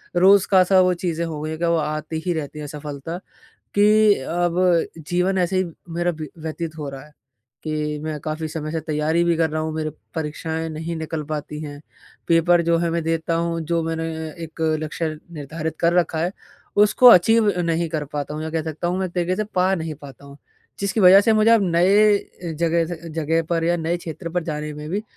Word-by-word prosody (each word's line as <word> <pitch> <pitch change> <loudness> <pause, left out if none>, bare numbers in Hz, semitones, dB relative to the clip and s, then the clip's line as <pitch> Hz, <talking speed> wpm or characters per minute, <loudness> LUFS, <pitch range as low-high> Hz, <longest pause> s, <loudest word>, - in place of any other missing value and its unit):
रोज़ 190 +2 +6
का 190 -1 +7
सा 190 +1 +4
वो 180 0 +3
चीज़ें 170 -1 -1
हो 160 -3 -5
गई 155 - -4
हैं 160 0 -5
कि 170 - 0
वो 170 - +2
आती 155 +1 -3
ही 180 - +1
रहती 150 -1 -5
है - - -5
असफलता 150 +2 -6 0.6
कि 210 0 +5
अब 175 +1 0 0.5
जीवन 180 +2 +1
ऐसे 185 +1 +1
ही 185 - +2 0.3
मेरा 175 0 +1
बी 155 - -5
व्यतीत 160 0 -5
हो 145 - -4
रहा 135 -1 -9
है 150 - -20 0.5
कि 150 -1 -2
मैं 155 -1 -3
काफ़ी 155 +2 -4
समय 155 0 -5
से 160 - -1
तैयारी 155 +2 0
भी 170 -1 +2
कर 160 -1 +1
रहा 155 +1 -2
हूँ 160 - -3
मेरे 155 -1 -2 0.2
परीक्षाएँ 160 +1 -3
नहीं 160 +2 -5
निकल 160 0 -4
पाती 150 0 -5
हैं। 145 -1 -8 0.5
पेपर 170 +1 +4
जो 170 - +4
है 170 0 0
मैं 170 0 -1
देता 165 0 -1
हूँ 170 0 -1
जो 170 -1 +2
मैंने 165 0 -2 0.4
एक 160 0 -12
अ, 155 -1 +2
लक्ष्य 160 +1 -3 0.2
निर्धारित 155 +1 -5
कर 170 0 +3
रखा 165 -1 -3
है, 175 +3 0 0.4
उसको 210 +4 +5
अचीव 215 +2 +5
नहीं 170 0 0
कर 155 -2 -3
पाता 145 +1 -3
हूँ 155 - -4
या 160 - -4
कह 160 0 -1
सकता 160 +2 -3
हूँ 180 +1 -1
मैं 190 - 0
एक 175 - -10
तरीके 180 +1 0
से 215 - -1
पा 185 +1 +3
नहीं 160 -3 -4
पाता 140 0 -12
हूँ। 140 0 -12 0.4
जिसकी 200 +2 0
वजह 190 +1 +8
से 225 +2 +3
मुझे 215 +1 +4
अब 230 -3 +5
नए 200 +5 +5
अ, 170 -4 -9
जगह 165 +1 +1
से 165 0 -10
जगह 165 +1 +1
पर 165 -1 +1
या 175 +1 +2
नए 170 +1 -1
क्षेत्र 170 0 -7
पर 180 +1 -1
जाने 150 -1 -4
में 150 0 -7
भी 205 +3 -1
165 Hz, 220 wpm, -22 LUFS, 155-175 Hz, 0.6 s, वजह